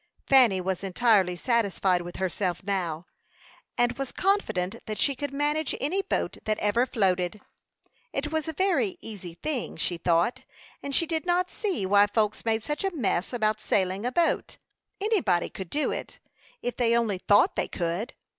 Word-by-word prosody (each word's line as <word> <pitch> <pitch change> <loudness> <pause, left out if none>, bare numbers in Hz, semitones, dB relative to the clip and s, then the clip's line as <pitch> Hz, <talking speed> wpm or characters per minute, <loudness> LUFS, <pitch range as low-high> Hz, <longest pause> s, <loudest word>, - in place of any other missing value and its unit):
Fanny 245 -8 +5
was 185 +1 -2
entirely 195 -2 +3
satisfied 195 -4 +1
with 175 0 -8
herself 185 -1 -2
now, 180 -4 -2 0.7
and 240 +2 +1
was 270 -2 -3
confident 235 - 0
that 215 -1 -3
she 280 - +2
could 285 +1 -4
manage 295 +2 0
any 355 +8 0
boat - - -2
that 215 0 0
ever 230 +5 +1
floated. 185 -3 0 0.7
It 290 +2 -3
was 315 0 -1
a 320 - -3
very 375 +2 +1
easy 185 -6 -8
thing, 275 - -3
she 175 - -1
thought, 170 +6 +1 0.4
and 280 -1 -3
she 335 - +4
did 325 +1 -2
not 360 +1 +1
see 385 - -2
why 205 +2 +5
folks 215 0 0
made 225 -1 +1
such 295 +3 -2
a 390 - +2
"fuss" 225 - -1
about 215 -3 0
sailing 190 -1 +1
a - - -1
boat; 340 +2 0 0.4
anybody 375 - +1
could 190 -3 -7
do 300 +1 0
it, - - -6 0.5
if 245 - -2
they 235 -1 +3
only 215 -5 0
thought 205 +2 +4
they - - 0
could. 175 +7 -3
220 Hz, 170 wpm, -27 LUFS, 190-290 Hz, 0.7 s, Fanny